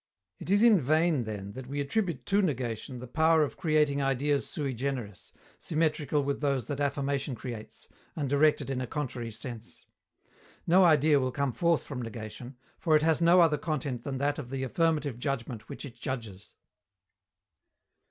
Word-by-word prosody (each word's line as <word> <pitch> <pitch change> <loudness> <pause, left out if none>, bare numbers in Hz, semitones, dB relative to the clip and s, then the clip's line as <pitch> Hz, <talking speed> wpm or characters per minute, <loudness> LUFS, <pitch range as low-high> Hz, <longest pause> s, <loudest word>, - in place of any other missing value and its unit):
It - - -8
is 205 +3 +4
in 220 -7 +6
vain, 155 -1 +2
then, 100 -2 -6
that 130 +3 -8
we 140 +2 -4
attribute 145 - -1
to 200 +1 +3
negation 130 - -2
the 125 - -7
power 160 +5 +3
of 145 - -3
creating 150 -4 +2
ideas 140 +1 0
sui 140 -3 -3
generis, 125 -6 -4 0.3
symmetrical 155 -2 0
with 140 +1 -2
those 140 -5 0
that 140 +2 -4
affirmation 140 -1 -1
creates, 115 -3 -8 0.3
and 145 -3 -2
directed 145 0 +2
in 130 -1 -2
a 125 - -3
contrary 125 -5 -4
sense. 115 +1 -9 0.8
No 185 +3 +5
idea 155 -2 +5
will 130 -1 -1
come 140 -1 -1
forth 170 +2 +2
from 130 -4 -6
negation, 115 +3 -8 0.2
for 160 -3 +3
it 155 - +4
has 160 0 +2
no 175 +2 +6
other 150 -3 +3
content 140 -5 -3
than 135 +1 -4
that 145 +2 0
of 130 -5 -7
the 135 0 -3
affirmative 150 -2 0
judgment 125 -5 -4
which - - -7
it 130 - -9
judges. 110 -7 -6
140 Hz, 170 wpm, -29 LUFS, 125-155 Hz, 0.8 s, in